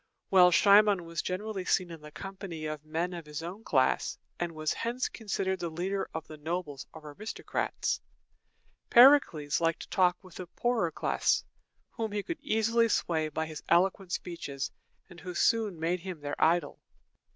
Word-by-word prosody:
While 180 -2 +7
Cimon 200 -1 +5
was 165 -1 -3
generally 195 +1 -3
seen 180 -1 +1
in 165 -2 -9
the 150 - -10
company 190 -1 -7
of 155 -1 -5
men 165 +4 -2
of 170 -3 -8
his 150 +1 -6
own 185 +6 -7
class, 130 -8 +1 0.2
and 175 -1 -2
was 155 0 -1
hence 240 +2 -2
considered 195 -4 -2
the 170 -1 -3
leader 185 +5 -3
of 160 -1 -5
the 155 - -11
nobles 155 -3 -4
or 155 -2 -10
aristocrats, 215 +9 -3 0.9
Pericles 235 - +6
liked 165 0 +1
to - - -10
talk 180 -1 +3
with 185 -2 -13
the 185 - -7
poorer 230 -1 0
class, - - +1 0.5
whom 220 -2 -4
he 205 -1 -1
could 340 - -5
easily 230 +1 +2
sway 160 -6 0
by 160 +1 -2
his 155 -1 -8
eloquent 185 +2 +2
speeches, 145 -7 -4 0.4
and 175 -1 -13
who 180 -1 -7
soon 215 -6 +2
made 170 +3 0
him 175 -3 -7
their 145 0 -2
idol. 170 +2 +2
175 Hz, 170 wpm, -30 LUFS, 160-200 Hz, 0.9 s, While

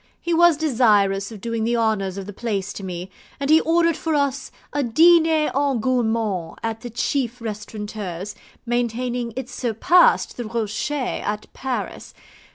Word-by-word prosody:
He 345 - -2
was 340 -1 +5
desirous 210 -9 +2
of 215 -3 -10
doing 230 0 -2
the 235 +1 +1
honours 205 -4 0
of 195 - -5
the 205 - -8
place 205 -3 -3
to 200 - -8
me, 180 0 -6 0.3
and 280 +1 0
he 320 +1 +7
ordered 335 0 +2
for 320 -1 -1
us 275 -2 -1 0.2
a 290 - +1
DINER 320 +4 +4
EN 280 -2 +1
GOURMAND 220 -8 -1
at 225 -1 -3
the 240 - -6
chief 245 +1 -1
restaurateur's, 210 -3 -6 0.3
maintaining 240 0 -1
it 260 -1 -4
surpassed 255 - +3
the 240 - -4
Rocher 220 +3 -2 0.3
at 210 0 -3
Paris. 260 -2 -5
235 Hz, 155 wpm, -22 LUFS, 210-275 Hz, 0.3 s, he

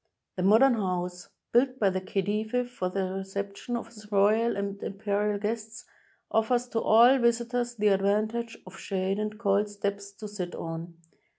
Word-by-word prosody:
The 185 - -3
modem 225 +8 +6
house, 180 -4 -3 0.2
built 255 +2 +3
by 200 -6 +3
the 185 0 -2
Khedive 215 +6 -1
for 185 -7 -2
the 195 +1 -2
recep 195 +1 -4
tion 240 +3 -4
of 235 - -5
his 210 -2 -15
royal 215 +4 +3
and 200 0 -3
imperial 205 +1 -1
guests, 220 +2 -4 0.5
offers 240 +2 +2
to 230 - 0
all 240 +5 +6
visitors 240 0 0
the 210 -1 +3
advantage 215 +4 0
of 185 +1 -12
shade 195 0 -1
and 215 0 -3
cold 205 -1 +1
steps 200 0 -3
to 210 +1 -8
sit 190 -4 -5
on. 165 +1 -6
210 Hz, 165 wpm, -28 LUFS, 195-230 Hz, 0.5 s, modem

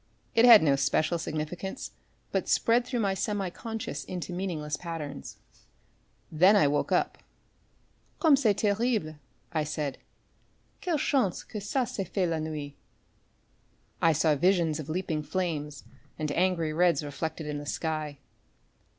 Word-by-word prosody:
It 230 - +5
had 230 -6 +10
no 140 -3 +4
special 155 +5 +1
significance, 160 - -4 0.4
but - - -1
spread 240 +1 +3
through 245 -2 -1
my 195 -2 +1
semi 195 -1 -2
consciousness 220 -9 -5
into 180 -1 -5
meaningless 165 -5 -3
patterns. 160 -5 -7 0.9
Then 180 +6 +6
I 195 -8 +5
woke 145 +1 0
up. - - +1 1.0
"Comme 315 -4 +6
c'est 230 -7 +2
terrible," 205 -6 0 0.4
I 155 -2 +1
said, 150 -2 -3 0.8
"quelle 345 -4 0
chance 260 - +1
que 210 - -7
ça 245 +5 -1
s'est 195 - -3
fait 190 -3 0
la 165 -1 -1
nuit!" 155 -2 -5 1.3
I 165 - +5
saw 155 0 +3
visions 165 0 +2
of 155 0 -7
leaping 160 -2 -2
flames 150 -4 -3 0.3
and 155 -2 -2
angry 170 -2 +1
reds 170 -2 +3
reflected 155 +2 -4
in 150 -1 -3
the 145 - -8
sky. 155 -2 -3
165 Hz, 140 wpm, -28 LUFS, 150-200 Hz, 1.3 s, had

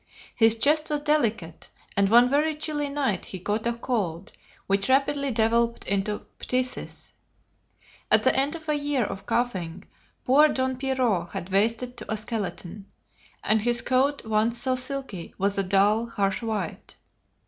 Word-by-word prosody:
His 225 -1 +5
chest 300 +6 +2
was 295 -1 -1
delicate, 230 - -1 0.3
and 200 0 +3
one 240 +3 +6
very 300 +4 +1
chilly 300 -1 -2
night 270 -10 -1
he 185 - -7
caught 210 +5 -2
a 235 - +1
cold 205 -7 -3 0.3
which 195 +3 +1
rapidly 280 +1 +2
developed 235 0 +1
into 200 +1 -2
phthisis. 255 0 -3 1.0
At - - +4
the - - +3
end 275 +4 +1
of 320 -1 -10
a 305 - +1
year 290 -3 0
of 195 0 -7
coughing, 190 -7 -2 0.4
poor 290 +4 +6
Don 260 -3 -1
Pierrot 250 -10 0
had 175 - -5
wasted 230 +5 0
to - - -7
a 215 - 0
skeleton, 205 -3 -5 0.6
and 215 0 +2
his 240 +1 +1
coat, 270 +2 +1
once 220 +2 +1
so 260 +2 +1
silky, 255 -8 -3
was 200 +1 0
a - - +2
dull, 200 +4 +2
harsh 200 -1 -1
white. 215 -7 -4
235 Hz, 155 wpm, -25 LUFS, 200-270 Hz, 1.0 s, one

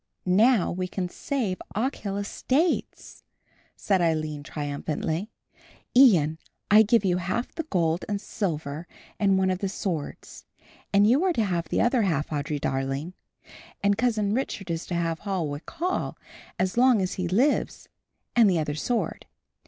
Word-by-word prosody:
"Now 210 +3 +4
we 185 +1 -2
can 180 -1 -3
save 220 -5 -2
the 205 - -6
Ochil 210 -5 -2
estates," 270 - -1 0.5
said 195 -3 +1
Aline 155 -3 0
triumphantly. 150 +6 -3 0.7
"Ian, 170 - +6 0.3
I 210 +1 +9
give 220 0 +3
you 180 -1 +2
half 185 +7 -2
the 325 -2 -5
gold 170 -2 +1
and 205 -1 -1
silver 160 -6 -4 0.3
and 195 -2 +3
one 190 0 +2
of 185 - -2
the 195 - -2
swords, 175 -6 -5 0.5
and 200 +1 +5
you 255 - +4
are 375 -2 +2
to 230 - +1
have 170 -4 -2
the - - +1
other 240 0 +3
half, 160 -8 0
Audry 145 0 -2
darling, 135 +6 -2 0.7
and 200 0 +4
Cousin 215 -3 +1
Richard 210 -7 -3
is 165 0 -3
to 175 - -3
have 165 -1 -1
Holwick 170 -7 -3
Hall 355 +3 -2 0.4
as 185 +4 -1
long 250 -2 +5
as 185 -1 -1
he 185 -2 -2
lives 245 - +1 0.5
and 230 -4 +6
the 180 - +2
other 150 -2 -1
sword. 230 +10 -2
190 Hz, 155 wpm, -26 LUFS, 165-220 Hz, 0.7 s, I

